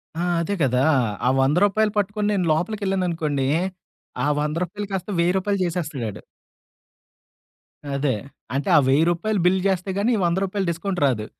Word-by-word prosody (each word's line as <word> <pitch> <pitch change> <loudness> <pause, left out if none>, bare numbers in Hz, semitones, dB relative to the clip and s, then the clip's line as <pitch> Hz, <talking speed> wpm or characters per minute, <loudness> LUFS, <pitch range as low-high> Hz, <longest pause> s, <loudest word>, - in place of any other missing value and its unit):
ఆ! - - -4 0.2
అదే 195 +5 -2
కదా! 130 -1 +2 0.4
ఆ - - +5
100 135 +3 +2
రూపాయలు 210 +1 +1
పట్టుకొని 205 +1 0
నేను 190 -3 0
లోపలికిెళ్ళాననుకోండి. 175 -6 -1 0.8
ఆ - - +1
100 150 +1 -1
రూపాయలు 205 +4 -5
కాస్త 190 +1 -3
1000 175 +2 +2
రూపాయలు 200 +1 -1
చేసేస్తడాడు. 150 - -4 1.7
అదే. 140 -3 0 0.4
అంటే 140 +1 -1
ఆ - - +8
1000 140 +4 +4
రూపాయలు 205 +4 -1
బిల్లు 185 +1 +3
చేస్తే 190 0 -1
గానీ 220 +5 +2
వంద 170 +1 +1
రూపాయలు 195 0 -2
డిస్కౌంట్ 175 +2 -3
రాదు. 120 -6 0
180 Hz, 145 wpm, -23 LUFS, 150-200 Hz, 1.7 s, ఆ